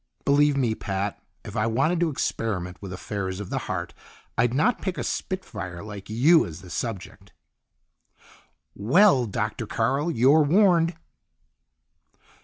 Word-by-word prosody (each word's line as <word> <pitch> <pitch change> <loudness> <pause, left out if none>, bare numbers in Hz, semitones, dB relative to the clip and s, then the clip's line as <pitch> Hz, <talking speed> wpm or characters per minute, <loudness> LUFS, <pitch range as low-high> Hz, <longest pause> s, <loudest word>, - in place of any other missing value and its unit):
"Believe 145 0 +4
me, 120 -5 +1
Pat, 100 -1 -3 0.2
if - - -8
I 105 - +1
wanted 155 +10 +1
to 170 -1 +2
experiment 95 - -3
with 100 -2 -7
affairs 95 0 -4
of 105 - -7
the - - -1
heart, - - -3 0.4
I'd 120 +1 +2
not 155 - +1
pick 190 -2 -3
a - - -2
spit 185 -1 -3
fire 90 -4 -7
like 105 -2 -9
you 145 +10 +5
as 85 +1 -8
the 90 -1 -12
subject." 110 -4 -6 1.4
"Well, 130 - +4
Doctor 110 +2 -3
Carl, 135 +10 0
you're 140 +2 +4
warned!" 170 +1 +3
115 Hz, 140 wpm, -25 LUFS, 100-155 Hz, 1.4 s, you